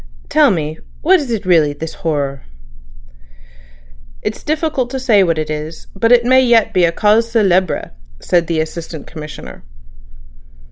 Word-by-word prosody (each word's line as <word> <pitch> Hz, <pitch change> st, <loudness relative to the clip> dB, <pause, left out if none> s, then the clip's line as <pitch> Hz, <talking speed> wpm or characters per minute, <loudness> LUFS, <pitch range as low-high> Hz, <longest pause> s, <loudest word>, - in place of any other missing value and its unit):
"Tell -, -, +4 dB
me, 155 Hz, -2 st, -2 dB, 0.2 s
what 370 Hz, +4 st, +5 dB
is 280 Hz, -4 st, -5 dB
it 225 Hz, -5 st, -3 dB
really—this 160 Hz, -3 st, +1 dB
horror?" 140 Hz, -4 st, -2 dB, 1.8 s
"It's -, -, -4 dB
difficult 310 Hz, -5 st, -1 dB
to 265 Hz, +1 st, -4 dB
say 230 Hz, -6 st, +3 dB
what 165 Hz, -3 st, 0 dB
it 155 Hz, 0 st, -3 dB
is, 155 Hz, +1 st, -6 dB
but 230 Hz, +4 st, +1 dB
it 240 Hz, -1 st, +5 dB
may 260 Hz, +1 st, +5 dB
yet 235 Hz, -3 st, +3 dB
be 180 Hz, -2 st, +4 dB
a 165 Hz, -, +1 dB
cause 215 Hz, +5 st, +2 dB
célèbre," 190 Hz, -5 st, +1 dB, 0.3 s
said 170 Hz, -, +1 dB
the 165 Hz, -2 st, 0 dB
Assistant 160 Hz, -1 st, -7 dB
Commissioner. 150 Hz, -, -10 dB
180 Hz, 145 wpm, -16 LUFS, 155-235 Hz, 1.8 s, what